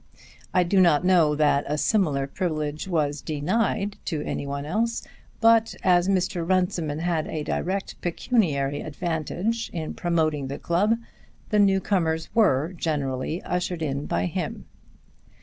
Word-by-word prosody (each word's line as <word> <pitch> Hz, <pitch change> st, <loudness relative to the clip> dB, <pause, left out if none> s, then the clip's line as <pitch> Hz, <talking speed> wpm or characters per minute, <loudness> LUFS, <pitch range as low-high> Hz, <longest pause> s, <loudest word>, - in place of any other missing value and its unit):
I 180 Hz, -, +3 dB
do 190 Hz, +3 st, +2 dB
not 170 Hz, -2 st, +4 dB
know 170 Hz, -5 st, +4 dB
that 145 Hz, -1 st, +3 dB
a 150 Hz, -, -1 dB
similar 150 Hz, -4 st, +1 dB
privilege 155 Hz, 0 st, -3 dB
was 150 Hz, -5 st, 0 dB
denied 200 Hz, +6 st, -1 dB
to 155 Hz, -5 st, -2 dB
any 140 Hz, -, -3 dB
one 140 Hz, 0 st, -4 dB
else; 230 Hz, +8 st, -1 dB, 0.3 s
but 225 Hz, 0 st, +4 dB
as 180 Hz, -1 st, +4 dB
Mr. 185 Hz, -2 st, 0 dB
Runciman 175 Hz, -4 st, 0 dB
had 165 Hz, -1 st, -1 dB
a 155 Hz, -2 st, -3 dB
direct 190 Hz, +6 st, -3 dB
pecuniary 150 Hz, -, 0 dB
advantage 175 Hz, +8 st, -2 dB
in 160 Hz, -2 st, -4 dB
promoting 155 Hz, -5 st, 0 dB
the 140 Hz, -, -5 dB
club, 200 Hz, +7 st, +2 dB, 0.5 s
the 210 Hz, -, +2 dB
new 195 Hz, -1 st, +4 dB
comers 165 Hz, -5 st, 0 dB
were 180 Hz, -, +3 dB
generally 150 Hz, -2 st, -2 dB
ushered 180 Hz, -2 st, -2 dB
in 140 Hz, -1 st, -2 dB
by 85 Hz, +1 st, 0 dB
him. 90 Hz, -, -4 dB
165 Hz, 140 wpm, -25 LUFS, 150-190 Hz, 0.5 s, not